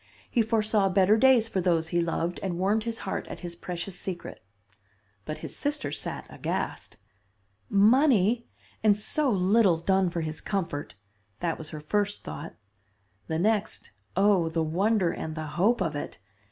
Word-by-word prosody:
He 240 - +3
foresaw 215 -3 +2
better 190 +2 +4
days 245 -1 +5
for 195 -4 -1
those 165 -3 +1
he 175 -1 +1
loved, 170 +1 -2
and 180 -3 -2
warmed 205 +4 +1
his 230 -1 -3
heart 190 - -3
at - - -8
his 175 -2 -6
precious 180 +1 -5
secret. 180 -3 -6 0.8
"But 155 - -4
his - - -6
sister 290 - -1
sat - - -2
aghast. - - -4 0.7
Money! 230 +1 +4 0.3
and 210 -2 +4
so 285 +7 0
little 195 -2 +4
done 190 +2 +2
for 170 0 -3
his 155 0 -4
comfort! 165 - -3 0.4
That 170 -2 -2
was 155 -1 -7
her 155 - -7
first 205 +6 -1
thought. - - -7 0.7
The 160 - -1
next, 210 - 0 0.3
oh, 195 -4 +4
the 160 0 0
wonder 185 +3 +1
and 160 0 -5
the 155 -1 -4
hope 195 +10 +1
of 160 -2 -1
it! 145 - -5
190 Hz, 160 wpm, -27 LUFS, 170-215 Hz, 0.8 s, days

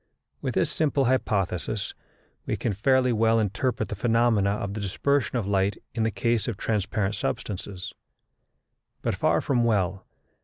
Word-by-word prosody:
With - - -2
this - - +2
simple 145 -3 +1
hypothesis 100 -5 0 0.5
we - - 0
can 115 - -1
fairly 125 +5 +3
well 115 +1 +3
interpret 110 +1 -1
the 105 - -3
phenomena 115 -2 +3
of 100 -1 -2
the 110 - -4
dispersion 130 +7 0
of 115 - -1
light 100 0 +1 0.2
in 115 - -2
the 110 - +2
case 115 +1 0
of 115 -5 -2
transparent 105 -1 -1
substances; 95 -3 -4 1.1
but - - +1
far - - +2
from 125 -4 +1
well, 100 -6 +2
as 95 - -12
M. - - -32
110 Hz, 160 wpm, -26 LUFS, 100-120 Hz, 1.1 s, fairly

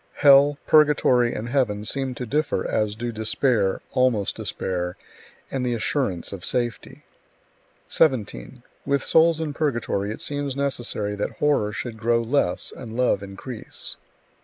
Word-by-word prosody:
Hell, 140 0 +6
purgatory, 140 -5 +4
and 115 +2 -4
heaven 110 -6 0
seem 130 +2 -2
to 125 - -5
differ 150 +6 -1
as 105 -1 0
do 120 +2 -4
despair, 110 -2 0
almost 125 -6 +1
despair, 90 -1 -3 0.5
and 135 -2 -2
the 120 -1 0
assurance 110 - -1
of 95 -3 -8
safety. 120 -2 -2 0.8
17. 115 - 0 0.2
With 140 -1 0
souls 165 0 +4
in 155 -2 -3
purgatory 120 -9 -1
it 110 - -5
seems 145 -2 -3
necessary 120 -7 -2
that 100 - -2
horror 145 -8 +2
should 110 +2 -5
grow 115 +1 +2
less 115 -6 0
and 115 -2 -8
love 125 -6 +2
increase. 100 +4 -8
120 Hz, 135 wpm, -24 LUFS, 105-140 Hz, 0.8 s, Hell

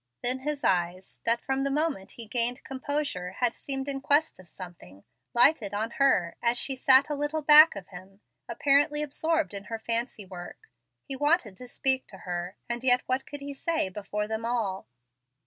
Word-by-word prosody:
Then 250 +2 0
his 290 +1 -4
eyes, 180 +1 -1
that 230 +1 +2
from 270 0 -1
the 275 - 0
moment 285 -9 -2
he 230 - -5
gained 240 +3 0
composure 265 -9 -4
had 245 +3 0
seemed 270 0 -4
in 275 -1 -3
quest 290 -1 +2
of 185 - -15
something, 170 - -12 0.3
lighted 235 -5 +4
on 220 +2 -2
her 175 -11 +3
as 240 0 +1
she 270 +2 +1
sat 260 +1 +5
a 300 - -3
little 295 +2 -2
back 305 0 +8
of 195 -2 -9
him, 190 +2 -13 0.3
apparently 290 +1 +2
absorbed 320 0 -1
in 200 0 -6
her 225 +1 -5
fancy 230 -1 -3
work. 185 - -11 0.4
He 275 - 0
wanted 290 - +1
to 250 - -11
speak 260 +1 0
to 195 - -12
her, 175 +1 -5
and 240 0 -4
yet 250 -1 +4
what 255 +1 -2
could 290 -1 -8
he 280 0 -6
say 320 - -1
before 210 +2 -4
them 220 +1 -4
all? 225 -5 -2
245 Hz, 185 wpm, -27 LUFS, 200-280 Hz, 0.4 s, back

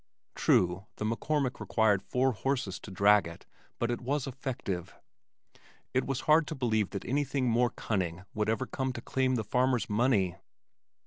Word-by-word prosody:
True 90 +3 +2
the 105 - -4
McCormick 130 +4 -1
required 105 -4 +2
four 130 +1 +1
horses 125 -5 -2
to - - -10
drag 100 0 +4
it 85 - -11 0.3
but 120 0 0
it 120 - -3
was 140 +2 -1
effective. 125 -9 -4 1.0
It 130 0 +1
was 135 -1 -1
hard 155 0 +4
to 155 - -4
believe 110 -6 +1
that 100 - -6
anything 140 -1 0
more 120 +1 +3
cunning 90 -6 -2
would 105 0 0
ever 115 +4 0
come 130 0 -2
to 120 - -6
claim 130 -1 +1
the 110 - -1
farmer's 125 +1 +1
money. 105 -6 +2
120 Hz, 165 wpm, -30 LUFS, 105-130 Hz, 1.0 s, drag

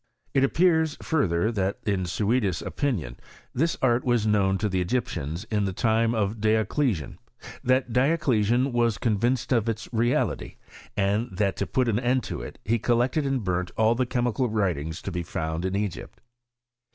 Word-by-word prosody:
It 135 - +3
appears, 160 +1 +2
further, 110 - +1
that 100 -2 -1
in 95 -4 0
Suidas*s 100 +1 0
opinion, 95 - -2 0.4
this 165 +6 0
art 120 -1 +3
was 120 -3 +1
known 100 -3 +2
to 105 - -1
the 95 -2 0
Egyptians 85 - -2
in 105 -2 +1
the 95 - -2
time 115 +3 +1
of 105 0 -1
Dioclesian; 110 - 0 0.4
that 130 -1 +1
Dioclesian 125 -3 +2
was 120 -2 +1
convinced 120 +3 0
of 115 -3 +2
its 110 -1 -3
reality; 120 +2 0 0.4
and 105 +4 +1
that, 100 -2 +1
to 100 - -2
put 130 -3 +1
an 110 -3 +1
endL 125 0 +1
to - - -5
it, - - -8
he 115 +3 +1
collected 125 +6 +1
and 135 -4 -1
burnt 90 -1 -1
all 110 +1 +4
the 125 +1 0
chemical 125 0 0
writingft 85 -7 -1
to 95 - -4
be 90 -1 -2
found 80 0 -3
in 95 +1 -1
Egypt. 100 -3 -4
110 Hz, 165 wpm, -26 LUFS, 95-125 Hz, 0.4 s, all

